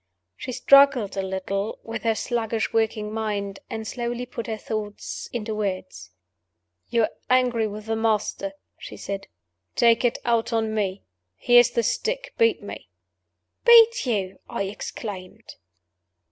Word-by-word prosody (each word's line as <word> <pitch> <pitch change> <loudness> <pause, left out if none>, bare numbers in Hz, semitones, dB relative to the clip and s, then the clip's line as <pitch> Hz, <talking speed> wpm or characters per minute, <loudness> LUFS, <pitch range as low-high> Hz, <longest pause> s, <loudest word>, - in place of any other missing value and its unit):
She 255 - -6
struggled 275 -5 +5
a 195 - 0
little 190 +2 -3
with 225 0 -5
her 225 -1 +1
sluggishly 225 -2 -2
working 215 -1 0
mind, 205 -3 -3
and 220 -1 -5
slowly 240 +2 -3
put 235 -2 -6
her 220 -1 -3
thoughts 210 -1 -5
into 220 -2 -3
words. 185 - -4 0.8
"You're 230 -2 +2 0.2
angry 250 -3 +3
with 210 0 -7
the 225 0 -1
Master," 225 +6 0 0.3
she - - -9
said. 195 -1 -5 0.5
"Take 230 0 +4
it 245 - +2
out 235 -1 +1
on 220 -1 0
Me. 200 -3 -2 0.3
Here's 245 - +6
the 235 -1 0
stick. - - -2
Beat 460 0 +3
me." - - -9 0.7
"Beat 470 - +7
you!" 195 -5 -1
I - - -2
exclaimed. 195 -1 -7
225 Hz, 135 wpm, -24 LUFS, 205-240 Hz, 0.8 s, Beat